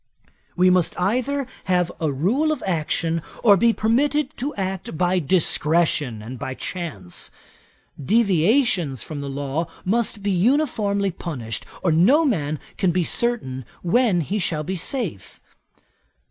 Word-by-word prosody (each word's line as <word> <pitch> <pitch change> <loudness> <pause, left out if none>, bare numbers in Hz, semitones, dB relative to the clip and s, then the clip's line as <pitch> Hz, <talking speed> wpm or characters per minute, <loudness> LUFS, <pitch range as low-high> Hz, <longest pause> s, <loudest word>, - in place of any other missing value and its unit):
We 185 0 +4
must 180 -2 +1
either 255 +9 0 0.2
have 180 -2 +1
a 155 -3 0
rule 220 - +1
of 305 - -3
action, 165 -1 0 0.2
or 205 -3 +7
be 230 +5 +4
permitted 280 +7 +1
to 280 +4 -3
act 190 -4 -4
by 180 +2 +2
discretion 150 - +1
and 120 +3 -8
by 130 -1 -4
chance. 135 - -5 0.7
Deviations 195 - +2
from 150 -3 -6
the 140 - -5
law 140 +4 -2 0.2
must 215 0 0
be 200 - +1
uniformly 205 - +1
punished, 130 -10 -5 0.2
or 175 - +3
no 245 - +5
man 155 - 0 0.2
can 190 - +3
be 175 +1 +1
certain 160 - -1 0.2
when 190 0 +3
he 200 +7 -2
shall 155 -4 -1
be 185 +5 -3
safe. 185 - -3
180 Hz, 135 wpm, -22 LUFS, 155-230 Hz, 0.7 s, or